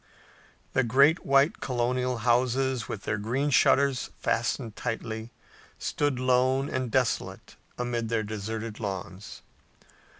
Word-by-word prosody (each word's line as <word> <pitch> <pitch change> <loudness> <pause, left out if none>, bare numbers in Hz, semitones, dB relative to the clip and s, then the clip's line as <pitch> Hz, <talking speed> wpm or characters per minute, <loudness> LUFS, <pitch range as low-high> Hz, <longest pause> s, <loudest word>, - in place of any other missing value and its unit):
The 130 - +3
great 140 +8 +4
white 140 +3 +4
colonial 125 0 -1
houses, 125 0 +1
with 105 - -5
their 105 - -2
green 130 +7 -1
shutters 135 0 +3
fastened 115 -1 -1
tightly, 110 0 -4 0.5
stood 145 -4 -1
lone 130 +2 +2
and 130 -1 -2
desolate - - -1 0.2
amid 120 -2 -2
their 115 -1 0
deserted 110 +1 -5
lawns. 95 -2 -6
125 Hz, 110 wpm, -27 LUFS, 110-130 Hz, 0.5 s, great